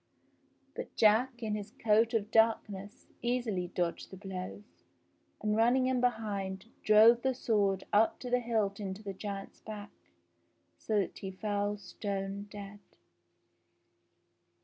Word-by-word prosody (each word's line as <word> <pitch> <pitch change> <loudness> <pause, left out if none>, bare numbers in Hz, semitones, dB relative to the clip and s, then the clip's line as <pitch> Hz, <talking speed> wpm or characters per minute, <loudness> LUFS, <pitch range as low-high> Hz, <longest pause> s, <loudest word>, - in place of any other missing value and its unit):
But - - -7
Jack 235 +3 +3
in 215 -1 -1
his 210 +1 -5
coat 225 -1 +3
of 215 0 -1
darkness 215 -3 +1 0.2
easily 240 -7 -1
dodged 175 -1 -2
the 190 - -10
blows, 190 +2 -8 0.6
and 210 0 0
running 240 +4 +4
in 255 -1 +1
behind, 200 -5 -1 0.2
drove 220 +3 +7
the 265 0 +1
sword 200 -6 +1
up 215 +2 +4
to 250 - -5
the 250 - +4
hilt 220 -4 0
into 195 +1 -5
the 200 -1 -4
giant's 195 0 -6
back, 210 -1 -8 0.9
so 215 - 0
that 185 - -5
he 195 - -5
fell 205 +1 -2
stone 200 0 -4
dead. 205 0 -9
210 Hz, 130 wpm, -32 LUFS, 195-225 Hz, 0.9 s, drove